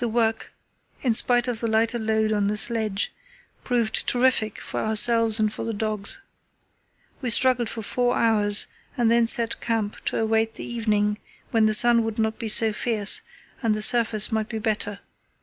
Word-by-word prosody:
The 240 Hz, -, -1 dB
work, 225 Hz, -1 st, -1 dB, 0.5 s
in 245 Hz, -4 st, +1 dB
spite 245 Hz, +2 st, +1 dB
of 240 Hz, -3 st, -3 dB
the 230 Hz, -, -3 dB
lighter 225 Hz, +2 st, 0 dB
load 220 Hz, 0 st, -1 dB
on 205 Hz, -1 st, 0 dB
the 210 Hz, +1 st, -2 dB
sledge, 220 Hz, -3 st, -1 dB, 0.5 s
proved 235 Hz, -3 st, -1 dB
terrific 245 Hz, -4 st, 0 dB
for -, -, -6 dB
ourselves 225 Hz, 0 st, +4 dB
and 215 Hz, 0 st, 0 dB
for -, -, -6 dB
the 225 Hz, -1 st, -4 dB
dogs. 210 Hz, -1 st, -3 dB, 1.0 s
We 250 Hz, -, -3 dB
struggled 245 Hz, -1 st, +4 dB
for 225 Hz, -, -7 dB
four 245 Hz, +3 st, -1 dB
hours, 210 Hz, -3 st, +2 dB, 0.3 s
and 235 Hz, -2 st, +2 dB
then 235 Hz, 0 st, +3 dB
set 230 Hz, 0 st, +2 dB
camp 225 Hz, -3 st, -3 dB
to -, -, -2 dB
await 225 Hz, 0 st, 0 dB
the -, -, -7 dB
evening, 210 Hz, -3 st, -1 dB, 0.3 s
when 225 Hz, -2 st, +2 dB
the 215 Hz, -, +5 dB
sun 240 Hz, +1 st, +5 dB
would 225 Hz, -1 st, -5 dB
not 220 Hz, 0 st, -2 dB
be 225 Hz, -, -4 dB
so 220 Hz, 0 st, +2 dB
fierce 210 Hz, -2 st, +2 dB, 0.4 s
and 225 Hz, -4 st, 0 dB
the 215 Hz, -, +2 dB
surface 225 Hz, -2 st, +2 dB
might 220 Hz, -1 st, -2 dB
be 225 Hz, -, -5 dB
better. 210 Hz, -2 st, -3 dB
225 Hz, 180 wpm, -23 LUFS, 215-235 Hz, 1.0 s, the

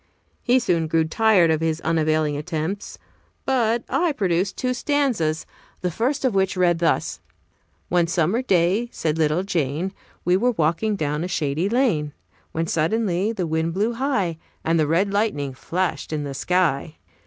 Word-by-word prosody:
He 250 Hz, +1 st, +3 dB
soon 170 Hz, -10 st, +1 dB
grew 160 Hz, +1 st, +2 dB
tired 185 Hz, -1 st, +4 dB
of 160 Hz, 0 st, 0 dB
his 160 Hz, -1 st, 0 dB
unavailing 155 Hz, -2 st, +1 dB
attempts, 160 Hz, +5 st, -4 dB, 0.5 s
but 235 Hz, -3 st, +1 dB
I 340 Hz, -3 st, +1 dB
produced 190 Hz, -4 st, 0 dB
two 255 Hz, -1 st, 0 dB
stanzas, 250 Hz, -, 0 dB, 0.4 s
the 180 Hz, -, -1 dB
first 265 Hz, -, -1 dB
of 255 Hz, -, +2 dB
which 190 Hz, -1 st, +1 dB
read 175 Hz, -2 st, +3 dB
thus: 165 Hz, -1 st, 0 dB, 0.7 s
"One 175 Hz, -1 st, +2 dB
summer 175 Hz, +7 st, +1 dB
day, 195 Hz, +1 st, +2 dB
said 160 Hz, 0 st, -2 dB
little 155 Hz, +3 st, +2 dB
Jane, 170 Hz, 0 st, -1 dB, 0.3 s
We 180 Hz, +1 st, +4 dB
were 245 Hz, +5 st, +2 dB
walking 170 Hz, +5 st, +1 dB
down 150 Hz, -2 st, -2 dB
a -, -, -2 dB
shady 160 Hz, +1 st, -1 dB
lane, 205 Hz, -, +1 dB, 0.4 s
When 165 Hz, +1 st, -1 dB
suddenly 185 Hz, +4 st, 0 dB
the 195 Hz, -6 st, -2 dB
wind 160 Hz, +1 st, -1 dB
blew 215 Hz, +5 st, +1 dB
high, 220 Hz, -, -1 dB, 0.3 s
And 165 Hz, 0 st, +2 dB
the 155 Hz, -, +2 dB
red 190 Hz, +6 st, +1 dB
lightning 150 Hz, -11 st, 0 dB
flashed 165 Hz, +2 st, -2 dB
in 150 Hz, -2 st, -2 dB
the 140 Hz, -1 st, -5 dB
sky. 160 Hz, -1 st, 0 dB
175 Hz, 160 wpm, -23 LUFS, 160-215 Hz, 0.7 s, tired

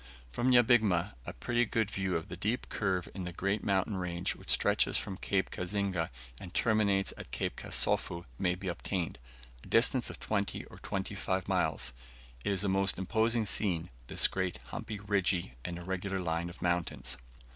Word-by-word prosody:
From 120 Hz, -, +1 dB
Nyabigma, 110 Hz, -, +5 dB
a -, -, -4 dB
pretty 120 Hz, -, +1 dB
good 110 Hz, -2 st, 0 dB
view 95 Hz, -2 st, -1 dB
of 80 Hz, -, -2 dB
the 90 Hz, -, -6 dB
deep 105 Hz, +6 st, -1 dB
curve 95 Hz, -4 st, 0 dB
in 95 Hz, -, -4 dB
the 90 Hz, -, -4 dB
great 100 Hz, +4 st, -1 dB
mountain 100 Hz, +1 st, +1 dB
range 90 Hz, -1 st, -1 dB
which -, -, -13 dB
stretches -, -, +3 dB
from 95 Hz, -, -3 dB
Cape 95 Hz, -1 st, 0 dB
Kazinga 95 Hz, -2 st, -1 dB, 0.3 s
and 90 Hz, -2 st, -9 dB
terminates 105 Hz, -4 st, +3 dB
at -, -, -8 dB
Cape -, -, -2 dB
Kasofu, 85 Hz, 0 st, 0 dB
may 90 Hz, -1 st, +2 dB
be 95 Hz, +1 st, -6 dB
obtained 90 Hz, 0 st, -2 dB, 0.4 s
a -, -, -12 dB
distance 120 Hz, +2 st, +5 dB
of -, -, -7 dB
twenty 100 Hz, -2 st, -1 dB
or -, -, -13 dB
twenty 95 Hz, +1 st, -3 dB
five 95 Hz, -2 st, -1 dB
miles. -, -, +1 dB, 0.5 s
It -, -, +1 dB
is 100 Hz, 0 st, +1 dB
a -, -, +1 dB
most 95 Hz, 0 st, +3 dB
imposing 110 Hz, +4 st, +2 dB
scene, 90 Hz, -5 st, 0 dB, 0.2 s
this -, -, +4 dB
great 95 Hz, -6 st, -2 dB
humpy, 110 Hz, -2 st, -5 dB
ridgy, 95 Hz, -8 st, +1 dB
and 85 Hz, -1 st, -4 dB
irregular 95 Hz, +2 st, -2 dB
line 85 Hz, -1 st, -1 dB
of 85 Hz, -, -9 dB
mountains. 85 Hz, -1 st, -1 dB
95 Hz, 175 wpm, -32 LUFS, 90-105 Hz, 0.5 s, Nyabigma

